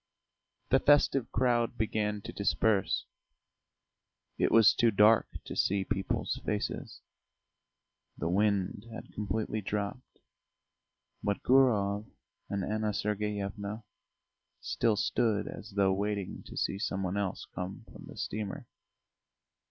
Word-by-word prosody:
The 135 Hz, -, +6 dB
festive 140 Hz, -3 st, +3 dB
crowd 120 Hz, -1 st, +1 dB
began 105 Hz, -1 st, -1 dB
to 110 Hz, -, -8 dB
disperse; 100 Hz, 0 st, +1 dB, 1.3 s
it -, -, +3 dB
was 115 Hz, -3 st, +7 dB
too 120 Hz, -, +3 dB
dark 105 Hz, +1 st, +5 dB, 0.2 s
to -, -, -6 dB
see 95 Hz, 0 st, +1 dB
people's 95 Hz, +1 st, -2 dB
faces. 105 Hz, -1 st, -3 dB, 1.2 s
The -, -, -2 dB
wind 100 Hz, +2 st, +1 dB
had 115 Hz, -, -9 dB
completely 110 Hz, +1 st, -2 dB
dropped, 105 Hz, +5 st, -4 dB, 1.0 s
but 100 Hz, 0 st, -1 dB
Gurov 105 Hz, -6 st, +3 dB, 0.4 s
and 100 Hz, -1 st, -1 dB
Anna 110 Hz, +1 st, -1 dB
Sergeyevna 105 Hz, 0 st, -3 dB, 0.8 s
still 110 Hz, -2 st, +1 dB
stood 105 Hz, 0 st, +1 dB
as 105 Hz, 0 st, -8 dB
though 95 Hz, -1 st, +3 dB
waiting 100 Hz, -1 st, -2 dB
to -, -, -9 dB
see 95 Hz, -, -1 dB
some 95 Hz, -3 st, -2 dB
one 95 Hz, +1 st, -2 dB
else 100 Hz, -2 st, -2 dB
come 90 Hz, +2 st, -6 dB
from -, -, -11 dB
the -, -, -11 dB
steamer. 105 Hz, -2 st, -4 dB
105 Hz, 115 wpm, -31 LUFS, 100-110 Hz, 1.3 s, was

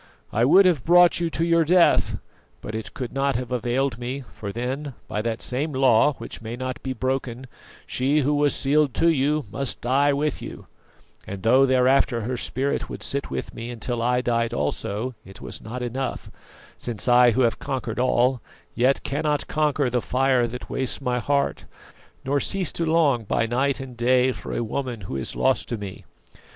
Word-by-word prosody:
I 115 Hz, +3 st, +3 dB
would 190 Hz, +9 st, +6 dB
have 165 Hz, -9 st, +2 dB
brought 175 Hz, +1 st, +5 dB
you 170 Hz, -1 st, 0 dB
to 165 Hz, +1 st, -1 dB
your 170 Hz, -1 st, +4 dB
death, 175 Hz, +2 st, +3 dB, 0.4 s
but 105 Hz, -, -7 dB
it 110 Hz, -1 st, -6 dB
could 125 Hz, -3 st, -5 dB
not 135 Hz, 0 st, 0 dB
have 125 Hz, 0 st, -3 dB
availed 125 Hz, +1 st, -1 dB
me: 130 Hz, +3 st, -4 dB
for 100 Hz, -2 st, -6 dB
then, 130 Hz, +4 st, -4 dB
by 105 Hz, -, -2 dB
that 115 Hz, 0 st, -3 dB
same 145 Hz, +5 st, -2 dB
law, 130 Hz, +2 st, +4 dB
which -, -, -9 dB
may 115 Hz, +1 st, -5 dB
not 130 Hz, 0 st, -5 dB
be 130 Hz, -, -4 dB
broken, 130 Hz, 0 st, -3 dB, 0.4 s
she 140 Hz, +4 st, +1 dB
who 145 Hz, +2 st, +1 dB
was 145 Hz, 0 st, +2 dB
sealed 145 Hz, 0 st, +1 dB
to 170 Hz, -, +3 dB
you 150 Hz, -1 st, +1 dB
must 140 Hz, +2 st, -2 dB
die 140 Hz, +4 st, +2 dB
with 145 Hz, +1 st, -1 dB
you; -, -, -8 dB, 0.6 s
and 95 Hz, -1 st, -7 dB
though 130 Hz, +4 st, +5 dB
thereafter 130 Hz, -1 st, +3 dB
her 125 Hz, +4 st, -3 dB
spirit 135 Hz, +3 st, -2 dB
would -, -, -7 dB
sit 140 Hz, 0 st, -2 dB
with -, -, -5 dB
me 120 Hz, +1 st, -6 dB
till 120 Hz, +1 st, -3 dB
I 125 Hz, +1 st, +2 dB
died 115 Hz, -2 st, 0 dB
also, 100 Hz, -, -2 dB
it 95 Hz, -, -13 dB
was -, -, -7 dB
not 125 Hz, +3 st, -6 dB
enough, 130 Hz, +2 st, -4 dB, 0.5 s
since 115 Hz, -3 st, -3 dB
I 125 Hz, -1 st, +6 dB
who 130 Hz, -, +1 dB
have 115 Hz, -2 st, +1 dB
conquered 125 Hz, -4 st, -4 dB
all, 125 Hz, 0 st, +2 dB, 0.3 s
yet 130 Hz, +3 st, +2 dB
cannot 150 Hz, +1 st, -1 dB
conquer 150 Hz, -2 st, +1 dB
the 125 Hz, 0 st, 0 dB
fire 130 Hz, -1 st, +2 dB
that 125 Hz, +2 st, -7 dB
wastes 130 Hz, -1 st, -2 dB
my 125 Hz, -2 st, -1 dB
heart, 140 Hz, +4 st, -1 dB, 0.6 s
nor 140 Hz, +2 st, +1 dB
cease 185 Hz, +3 st, -1 dB
to 165 Hz, -, -2 dB
long 155 Hz, -7 st, +3 dB
by 110 Hz, -, 0 dB
night 130 Hz, +4 st, 0 dB
and 130 Hz, -2 st, -8 dB
day 125 Hz, +2 st, +3 dB
for -, -, -8 dB
a -, -, -1 dB
woman 120 Hz, -1 st, -4 dB
who 85 Hz, -, -6 dB
is 65 Hz, -, -3 dB
lost 130 Hz, 0 st, +1 dB
to 120 Hz, -, -2 dB
me. 100 Hz, -3 st, -8 dB
130 Hz, 190 wpm, -24 LUFS, 120-140 Hz, 0.6 s, would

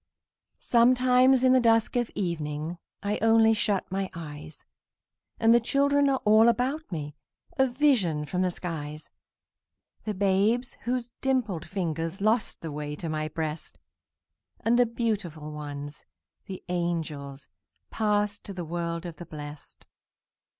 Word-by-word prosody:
Sometimes, 255 Hz, +2 st, +4 dB
in 255 Hz, 0 st, +6 dB
the 260 Hz, -, +6 dB
dusk 225 Hz, -1 st, +3 dB
of 240 Hz, -2 st, +1 dB
evening, 160 Hz, -2 st, -3 dB, 0.2 s
I 205 Hz, +1 st, -1 dB
only 225 Hz, 0 st, +5 dB
shut 205 Hz, -4 st, -1 dB
my 190 Hz, 0 st, -2 dB
eyes, 155 Hz, -1 st, -9 dB, 0.7 s
And 225 Hz, 0 st, +5 dB
the 235 Hz, -, +6 dB
children 280 Hz, +3 st, +2 dB
are 265 Hz, -1 st, +1 dB
all 215 Hz, +2 st, +6 dB
about 255 Hz, +6 st, -1 dB
me, 150 Hz, -3 st, -4 dB, 0.5 s
A 265 Hz, -, +5 dB
vision 240 Hz, -, +2 dB
from 180 Hz, +5 st, -2 dB
the 185 Hz, -, +2 dB
skies: 155 Hz, -4 st, -6 dB, 0.9 s
The 215 Hz, -1 st, -2 dB
babes 205 Hz, +6 st, +2 dB
whose 245 Hz, 0 st, -2 dB
dimpled 230 Hz, -11 st, 0 dB
fingers 165 Hz, -1 st, -3 dB
Lost 215 Hz, +2 st, 0 dB
the 160 Hz, -, -5 dB
way 150 Hz, 0 st, -5 dB
to 165 Hz, +2 st, -5 dB
my 155 Hz, 0 st, -2 dB
breast, 155 Hz, 0 st, -5 dB, 0.8 s
And 235 Hz, +2 st, +3 dB
the 245 Hz, -, +5 dB
beautiful 200 Hz, -10 st, -3 dB
ones, 145 Hz, -1 st, -7 dB, 0.4 s
the 190 Hz, -1 st, -7 dB
angels, 155 Hz, -6 st, -3 dB, 0.4 s
Passed 210 Hz, -1 st, 0 dB
to 200 Hz, -, -6 dB
the 175 Hz, -2 st, -4 dB
world 170 Hz, +1 st, -3 dB
of 170 Hz, -2 st, -7 dB
the 175 Hz, -, -9 dB
blest. 145 Hz, -2 st, -10 dB
190 Hz, 135 wpm, -27 LUFS, 155-235 Hz, 0.9 s, in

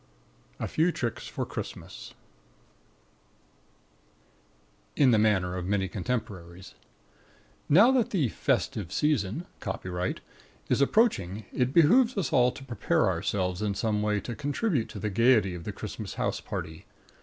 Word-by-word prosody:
A -, -, -2 dB
FEW 165 Hz, +3 st, +2 dB
TRICKS 120 Hz, -8 st, -4 dB
FOR -, -, -4 dB
CHRISTMAS -, -, -8 dB, 2.8 s
(In 135 Hz, -4 st, +5 dB
the 110 Hz, -, +4 dB
manner 95 Hz, -4 st, +2 dB
of 90 Hz, -1 st, -4 dB
many 95 Hz, -1 st, 0 dB
contemporaries) 95 Hz, -5 st, -5 dB, 1.0 s
Now 205 Hz, -, +7 dB
that 245 Hz, -3 st, +2 dB
the 160 Hz, -, +1 dB
"festive 95 Hz, -4 st, -1 dB
season" 150 Hz, -, 0 dB
(copyright) 90 Hz, 0 st, -4 dB, 0.5 s
is -, -, +2 dB
approaching, 110 Hz, -, +2 dB
it 125 Hz, 0 st, +1 dB
behoves 225 Hz, -, +5 dB
us 180 Hz, -5 st, -1 dB
all 125 Hz, -2 st, +4 dB
to 135 Hz, -, -11 dB
prepare 120 Hz, -3 st, +1 dB
ourselves 90 Hz, -2 st, -1 dB
in 105 Hz, -2 st, -1 dB
some 105 Hz, +1 st, 0 dB
way 105 Hz, -1 st, +1 dB
to 120 Hz, -, -5 dB
contribute 145 Hz, -, -1 dB
to 110 Hz, -, -8 dB
the 105 Hz, +1 st, -3 dB
gaiety 110 Hz, -3 st, +3 dB
of 85 Hz, -1 st, -8 dB
the -, -, -3 dB
Christmas -, -, -7 dB
house -, -, -2 dB
party. 80 Hz, 0 st, -6 dB
110 Hz, 135 wpm, -28 LUFS, 95-145 Hz, 2.8 s, Now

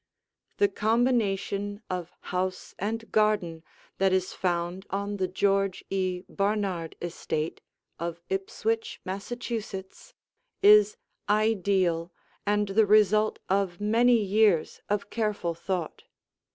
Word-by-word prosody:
The 405 Hz, -, +5 dB
combination 215 Hz, -, 0 dB
of 180 Hz, -2 st, -4 dB, 0.2 s
house 185 Hz, 0 st, -2 dB
and 225 Hz, +3 st, -3 dB
garden 205 Hz, -7 st, +1 dB, 0.4 s
that 195 Hz, 0 st, +3 dB
is 185 Hz, -1 st, 0 dB
found 175 Hz, +1 st, -2 dB
on 200 Hz, +1 st, -2 dB
the 185 Hz, -1 st, 0 dB
George 195 Hz, +1 st, +1 dB
E. 185 Hz, -2 st, -1 dB
Barnard 195 Hz, -5 st, -1 dB
estate 165 Hz, -2 st, -3 dB, 0.4 s
of 170 Hz, 0 st, -4 dB
Ipswich, 215 Hz, +4 st, -2 dB
Massachusetts, 210 Hz, -, -5 dB, 0.5 s
is 425 Hz, +2 st, +7 dB, 0.3 s
ideal 195 Hz, -5 st, +2 dB, 0.4 s
and 205 Hz, 0 st, +2 dB
the 210 Hz, +2 st, +3 dB
result 215 Hz, +1 st, +4 dB
of 190 Hz, -2 st, 0 dB
many 230 Hz, +4 st, +4 dB
years 205 Hz, -4 st, +2 dB
of 205 Hz, 0 st, -1 dB
careful 210 Hz, -6 st, -1 dB
thought. 170 Hz, 0 st, -4 dB
200 Hz, 105 wpm, -27 LUFS, 185-215 Hz, 0.5 s, is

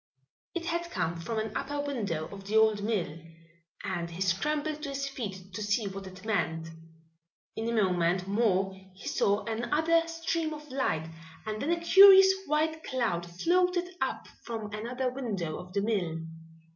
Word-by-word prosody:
It 340 Hz, -1 st, -3 dB
had 340 Hz, 0 st, -2 dB
come 170 Hz, -, -2 dB
from 225 Hz, +6 st, -3 dB
an 220 Hz, -1 st, -3 dB
upper 285 Hz, +1 st, -2 dB
window 210 Hz, -, -2 dB
of 195 Hz, +1 st, -10 dB
the 215 Hz, +2 st, +2 dB
old 220 Hz, -2 st, +4 dB
mill 190 Hz, -7 st, -1 dB, 0.6 s
and 170 Hz, -3 st, -3 dB
he 170 Hz, +1 st, -9 dB
scrambled 295 Hz, -, 0 dB
to 295 Hz, -, -4 dB
his 275 Hz, 0 st, -2 dB
feet 195 Hz, -8 st, -6 dB
to 210 Hz, -, -4 dB
see 205 Hz, +1 st, +1 dB
what 195 Hz, 0 st, -6 dB
it 185 Hz, +1 st, -12 dB
meant. 165 Hz, -6 st, -1 dB, 0.9 s
In 225 Hz, +1 st, -2 dB
a 225 Hz, -2 st, +3 dB
moment 180 Hz, 0 st, +1 dB
more 195 Hz, -2 st, +2 dB, 0.2 s
he 190 Hz, -, -10 dB
saw 200 Hz, +1 st, +1 dB
another 305 Hz, +9 st, +1 dB
stream 330 Hz, -1 st, -2 dB
of 300 Hz, 0 st, -11 dB
light 165 Hz, -12 st, 0 dB, 0.4 s
and 215 Hz, 0 st, -3 dB
then 290 Hz, -, -1 dB
a 340 Hz, 0 st, +2 dB
curious 385 Hz, +2 st, +9 dB
white 315 Hz, +2 st, 0 dB
cloud 225 Hz, -10 st, -1 dB
floated 355 Hz, -, +1 dB
up -, -, -2 dB
from 220 Hz, -3 st, -6 dB
another 245 Hz, +4 st, -2 dB
window 200 Hz, -12 st, -3 dB
of 180 Hz, 0 st, -10 dB
the 200 Hz, +1 st, 0 dB
mill. 185 Hz, -7 st, -1 dB
220 Hz, 165 wpm, -29 LUFS, 190-300 Hz, 0.9 s, curious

